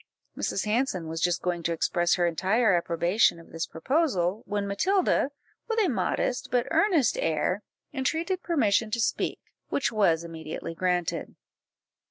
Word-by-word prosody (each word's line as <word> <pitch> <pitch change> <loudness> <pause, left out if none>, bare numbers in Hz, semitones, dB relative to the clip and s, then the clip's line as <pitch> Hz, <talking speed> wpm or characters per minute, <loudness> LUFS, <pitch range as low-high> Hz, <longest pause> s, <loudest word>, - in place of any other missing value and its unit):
Mrs. 195 - -2
Hanson 210 -6 0
was 165 0 -4
just 175 -1 +1
going 175 -1 -1
to 170 0 -1
express 175 +1 +1
her 175 - +1
entire 190 +6 +2
approbation 170 +2 +2
of 165 - -16
this 165 0 -3
proposal, 205 - 0
when 205 0 -1
Matilda, 350 - +2 0.4
with 455 -1 -2
a 415 - +3
modest, 250 - -1
but 245 -1 +1
earnest 340 - +3
air, 165 +5 0 0.3
entreated 325 +7 -1
permission 225 - +2
to 235 - -2
speak, 225 - 0 0.3
which 280 - 0
was 185 -7 +2
immediately 160 -1 -6
granted. 180 0 -1
195 Hz, 145 wpm, -27 LUFS, 170-250 Hz, 0.4 s, a